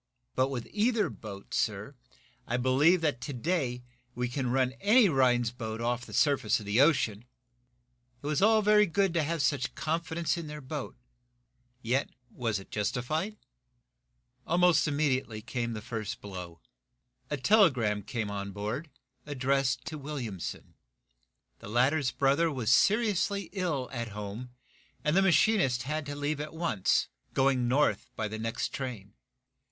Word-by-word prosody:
But 130 +1 +1
with 125 -4 -4
either 220 +1 +1
boat, 100 -2 -10
sir, 105 +4 -1 0.5
I 120 - 0
believe 140 +8 +4
that, 145 -6 0
to 145 - -5
day, 125 -3 -1 0.3
we 125 +1 -1
can 130 0 -2
run 130 0 +2
any 215 +3 +6
Rhinds 125 -5 +3
boat 110 -2 -5
off 120 +1 -2
the - - -11
surface 140 -8 +2
of 105 - -10
the 105 +5 +3
ocean!" 120 -8 +2 1.0
It - - -9
was 150 +2 0
all 215 +1 +5
very 210 0 +5
good 190 +1 +1
to 170 - +2
have 160 0 -1
such 130 -1 0
confidence 165 +1 -1
in 165 - -6
their 150 0 -7
boat. 145 -1 -6 0.9
Yet 130 +5 0 0.2
was 115 -4 -1
it 95 - -7
to - - -26
be - - -15
justified? 155 - -2 1.1
Almost 175 0 +4
immediately 135 -6 0
came 120 0 -3
the 105 -1 -6
first 110 -3 -4
blow. 90 -5 -8 0.7
A 145 - -1
telegram 130 - +3
came 105 0 -4
on 100 0 -4
board, 110 - -4 0.4
addressed 135 -2 0
to 155 -1 -5
Williamson. 130 - -6 0.9
The - - -10
latter's 130 +5 +2
brother 140 +5 +2
was 125 -5 0
seriously 200 - +2
ill 165 -10 -1
at 120 -2 -3
home, 105 +4 -6 0.5
and 150 +2 +1
the 195 - +5
machinist 190 - +3
had 150 +2 -3
to 145 - -4
leave 145 +1 -2
at 150 +2 -7
once, 160 - +1 0.3
going 130 -2 +2
north 125 -5 +1
by 110 - -2
the 110 +1 -6
next 115 +1 -2
train. 115 -7 -6
135 Hz, 155 wpm, -29 LUFS, 115-160 Hz, 1.1 s, any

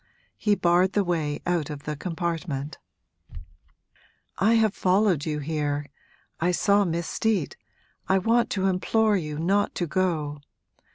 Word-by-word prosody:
He 210 -1 +1
barred 180 +1 +3
the 205 - +2
way 160 -5 -2
out 170 -4 0
of 145 -2 -7
the 150 - -4
compartment. 165 -3 -4 1.6
'I 220 +4 +4
have 220 -3 +3
followed 185 -6 +2
you 150 -1 -1
here 145 -1 -2 0.5
I 170 - +1
saw 200 +3 +3
Miss 170 -1 -2
Steet 210 -9 -1 0.5
I 190 - +4
want 230 +5 +2
to 190 -2 -1
implore 210 +3 +2
you 150 -5 -3
not 195 +6 +1
to 175 - -1
go! 155 -5 -1
175 Hz, 135 wpm, -25 LUFS, 150-200 Hz, 1.6 s, I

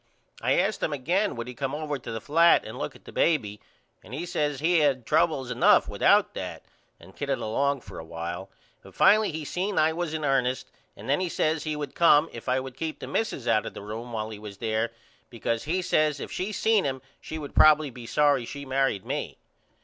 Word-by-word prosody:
I 130 +3 +2
asked 195 +4 +1
him 155 - 0
again 175 +9 0
would 115 0 -5
he 125 - -6
come 135 +2 -3
over 150 -2 -3
to - - -8
the 115 - -3
flat 165 +8 +4
and - - -7
look - - -4
at - - -18
the - - -10
baby 110 -11 +1 0.4
and 125 - -8
he 165 +5 -4
says 150 -5 -1
he 165 +3 +3
had 135 -5 +2
troubles 150 -4 +1
enough 125 - +4
without - - +3
that - - -6 0.4
and 95 +3 -16
kidded 140 -2 -1
along 140 +5 0
for - - -10
a - - -7
while 85 +3 -6 0.3
but - - -16
finally 215 -1 +5
he 155 -1 -5
seen 190 +6 -2
I 155 +1 +4
was 165 -1 -3
in 155 -1 -2
ernest 130 -2 0 0.3
and 105 - -10
then 140 +5 +2
he 185 -1 -1
says 155 0 0
he 155 -1 -2
would 145 -2 -5
come 165 -2 +5
if 115 +2 -6
I 130 +1 +2
would 130 -1 -8
keep 160 +2 -4
the - - -7
missus 140 - -2
out 110 -2 +2
of - - -8
the - - -8
room 115 +4 -7
while 110 -1 -3
he 105 - -8
was 105 -2 -9
there 110 +1 -1 0.4
because 115 0 -3
he 180 +4 -1
says 155 -3 +2
if - - -6
she 190 +4 -3
seen 215 0 +2
him 130 -1 -3 0.2
she 160 - -7
would 145 -2 -7
probily 155 -2 +6
be 120 -1 -10
sorry 145 -3 +3
she 140 +4 -7
married 135 -6 0
me. - - -4
140 Hz, 225 wpm, -26 LUFS, 115-160 Hz, 0.4 s, probily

